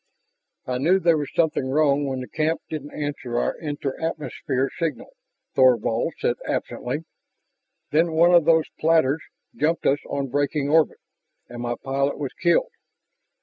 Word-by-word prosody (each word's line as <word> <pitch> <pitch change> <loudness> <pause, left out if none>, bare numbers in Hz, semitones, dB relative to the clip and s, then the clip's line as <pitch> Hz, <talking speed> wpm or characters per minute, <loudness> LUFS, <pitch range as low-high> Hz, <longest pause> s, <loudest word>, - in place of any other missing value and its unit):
"I 125 0 -2
knew 170 +8 +4
there 170 -3 +4
was 145 - -4
something 155 -5 +1
wrong 145 0 +2
when 130 -1 -3
the 125 - -7
camp 160 +1 -1
didn't 150 -2 -5
answer 145 -5 -4
our - - 0
enter 145 -3 -4
atmosphere 145 -4 -2
signal," 165 - -3 0.4
Thorvald 120 -3 +3
said - - 0
absently. 135 +6 -3 0.9
"Then 160 +2 +2
one 170 +2 +5
of 170 -3 +6
those 160 -1 +4
platters 160 -2 +3 0.3
jumped 160 +3 0
us 140 +2 +3
on 140 -1 -2
braking 145 +1 0
orbit, 160 0 +3 0.5
and 120 0 -7
my 120 0 -2
pilot 140 +1 0
was 140 -3 -4
killed. 170 -1 +2
145 Hz, 145 wpm, -24 LUFS, 135-160 Hz, 0.9 s, of